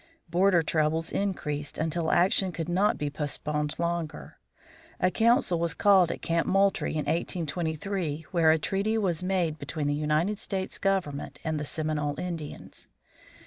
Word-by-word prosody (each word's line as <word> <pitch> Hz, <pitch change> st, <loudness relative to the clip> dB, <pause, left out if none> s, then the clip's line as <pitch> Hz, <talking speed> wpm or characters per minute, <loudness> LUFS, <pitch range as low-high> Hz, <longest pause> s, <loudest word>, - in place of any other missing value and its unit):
Border 175 Hz, 0 st, +3 dB
troubles 160 Hz, +1 st, 0 dB
increased 150 Hz, -7 st, -2 dB
until 160 Hz, +1 st, -1 dB
action 185 Hz, +1 st, +3 dB
could 165 Hz, -2 st, -4 dB
not 185 Hz, +4 st, +2 dB
be 145 Hz, -1 st, -2 dB
postponed 150 Hz, 0 st, -2 dB
longer. 170 Hz, -2 st, -3 dB, 0.6 s
A 185 Hz, -, +2 dB
council 230 Hz, -, +3 dB
was 170 Hz, -2 st, -1 dB
called 190 Hz, -4 st, +5 dB
at -, -, -7 dB
Camp 165 Hz, 0 st, 0 dB
Moultrie 195 Hz, +1 st, +2 dB
in 155 Hz, -1 st, -1 dB
1823, 165 Hz, 0 st, -2 dB
where 170 Hz, -4 st, +4 dB
a 160 Hz, -, +5 dB
treaty 200 Hz, +7 st, 0 dB
was 185 Hz, -6 st, 0 dB
made 180 Hz, -4 st, 0 dB
between 150 Hz, +1 st, -3 dB
the 145 Hz, -, +1 dB
United 155 Hz, +7 st, 0 dB
States 190 Hz, -1 st, -4 dB
government 185 Hz, -8 st, -1 dB
and 155 Hz, -1 st, -1 dB
the 150 Hz, -, -3 dB
Seminole 150 Hz, -1 st, -2 dB
Indians. 170 Hz, -4 st, -6 dB
165 Hz, 145 wpm, -28 LUFS, 150-190 Hz, 0.6 s, called